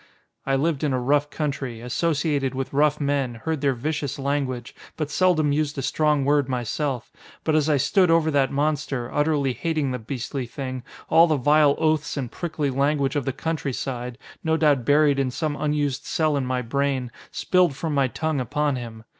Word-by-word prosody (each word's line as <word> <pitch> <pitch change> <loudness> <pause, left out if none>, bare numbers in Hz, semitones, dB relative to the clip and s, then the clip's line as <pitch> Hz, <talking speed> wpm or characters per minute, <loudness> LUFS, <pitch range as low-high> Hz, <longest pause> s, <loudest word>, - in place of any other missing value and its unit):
I 135 - +2
lived 150 +1 0
in 145 -3 +1
a 130 - +1
rough 145 +3 +1
country. 140 -6 -3
Associated 140 +1 0
with 135 +1 -4
rough 150 +1 +3
men, 140 -4 0
heard 150 +6 -3
their 140 -2 +2
vicious 145 +2 -3
language, 135 -3 -2 0.2
but 150 -2 -3
seldom 160 -4 +3
used 150 0 0
a 135 - -2
strong 150 0 +1
word 145 -1 +2
myself. 125 +1 -2 0.3
But 155 - +1
as 155 0 +2
I 150 - +4
stood 180 +7 +3
over 165 -1 +3
that 140 -2 +2
monster, 140 -4 -1
utterly 145 -3 +1
hating 155 -2 -1
the 125 - -3
beastly 125 +2 -4
thing, 130 0 -5 0.3
all 165 +1 +6
the 155 - +2
vile 145 +1 +4
oaths 155 -2 0
and 130 -4 -3
prickly 155 -5 -2
language 140 +1 +1
of 145 -3 -1
the 135 - 0
countryside, 135 -4 -3 0.3
no 160 0 +2
doubt 145 -6 +3
buried 145 -1 +4
in 135 -2 +1
some 145 +3 -2
unused 145 -2 -1
cell 155 -2 +1
in 135 -2 -1
my 125 0 -1
brain, 135 0 -1 0.2
spilled 180 -6 +2
from 160 +2 -3
my 140 -2 +3
tongue 155 +3 -2
upon 140 +3 0
him. 115 -2 -8
145 Hz, 185 wpm, -24 LUFS, 130-155 Hz, 0.3 s, all